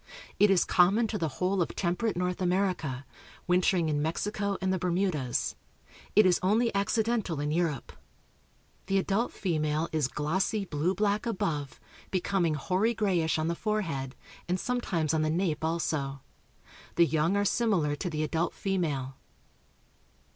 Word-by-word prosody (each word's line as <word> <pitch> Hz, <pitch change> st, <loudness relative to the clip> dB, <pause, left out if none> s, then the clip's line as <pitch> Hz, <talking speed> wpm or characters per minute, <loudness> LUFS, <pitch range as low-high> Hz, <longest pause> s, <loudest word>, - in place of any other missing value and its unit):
It 205 Hz, -, +6 dB
is 195 Hz, -2 st, +4 dB
common 195 Hz, +6 st, +4 dB
to 210 Hz, -, -2 dB
the 160 Hz, -, 0 dB
whole 185 Hz, +1 st, +1 dB
of 170 Hz, -, -2 dB
temperate 185 Hz, +3 st, -1 dB
North 180 Hz, +1 st, -1 dB
America, 180 Hz, -8 st, 0 dB, 0.4 s
wintering 180 Hz, -1 st, +2 dB
in 150 Hz, -1 st, 0 dB
Mexico 200 Hz, +5 st, -1 dB
and 190 Hz, 0 st, 0 dB
the 185 Hz, -, -1 dB
Bermudas. 175 Hz, -8 st, 0 dB, 0.6 s
It 210 Hz, 0 st, +7 dB
is 180 Hz, -2 st, +4 dB
only 220 Hz, +5 st, +2 dB
accidental 210 Hz, -4 st, 0 dB
in 150 Hz, +1 st, -1 dB
Europe. 160 Hz, -5 st, -1 dB, 1.0 s
The 195 Hz, -, +2 dB
adult 200 Hz, +5 st, 0 dB
female 155 Hz, -3 st, -1 dB
is 155 Hz, -4 st, +1 dB
glossy 190 Hz, +9 st, -1 dB
blue 165 Hz, +3 st, -1 dB
black 210 Hz, +2 st, 0 dB
above, 150 Hz, -, -2 dB, 0.3 s
becoming 180 Hz, -3 st, 0 dB
hoary 190 Hz, -, 0 dB
grayish 180 Hz, -8 st, +1 dB
on 155 Hz, 0 st, 0 dB
the 170 Hz, -, +1 dB
forehead, 165 Hz, -10 st, -2 dB, 0.3 s
and 180 Hz, +1 st, +1 dB
sometimes 180 Hz, -, -1 dB
on 160 Hz, -, +2 dB
the 155 Hz, -, +1 dB
nape 160 Hz, -2 st, 0 dB
also. 155 Hz, -4 st, -1 dB, 0.7 s
The 170 Hz, -, +6 dB
young 160 Hz, +4 st, +1 dB
are 205 Hz, -, +1 dB
similar 195 Hz, -10 st, +1 dB
to 180 Hz, -, -3 dB
the 155 Hz, -1 st, -2 dB
adult 165 Hz, +3 st, -1 dB
female. 145 Hz, -9 st, -2 dB
180 Hz, 145 wpm, -29 LUFS, 155-200 Hz, 1.0 s, It